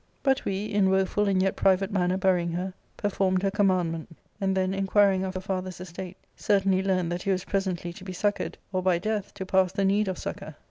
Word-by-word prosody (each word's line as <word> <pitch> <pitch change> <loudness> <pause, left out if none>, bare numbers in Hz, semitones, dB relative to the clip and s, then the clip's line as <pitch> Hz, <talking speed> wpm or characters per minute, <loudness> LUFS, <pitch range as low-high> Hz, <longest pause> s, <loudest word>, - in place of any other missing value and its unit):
* - - -39
" - - -40
But 270 -1 +2
we, 195 +1 -1
in 205 -2 +2
woeful 190 +2 +2
and 195 -1 +2
yet 190 - +1
private 195 +1 +2
manner 185 -2 +1
burying 180 -3 +1
her, 185 +2 -3 0.2
performed 190 -2 0
her 195 - +2
commandment; 180 -5 0 0.2
and 190 -1 +1
then, 185 0 +1
inquiring 195 0 +3
of 190 0 -4
her 185 - -3
fJEither's 185 -2 -4
estate, 185 +1 -8 0.2
certainly 195 -2 +2
learned 185 -3 0
that 175 +1 -2
he 195 - -3
was 190 -1 +1
presently 185 -3 -2
to 175 - -12
be 190 - -6
succoured, 205 +3 -1 0.2
or 185 - +1
by 180 -2 +3
death 210 +2 -2
to 190 - -5
pass 190 -1 +3
the 195 0 0
need 205 +2 +2
of 185 -2 -2
succour. 155 - -6
190 Hz, 225 wpm, -27 LUFS, 185-195 Hz, 0.2 s, inquiring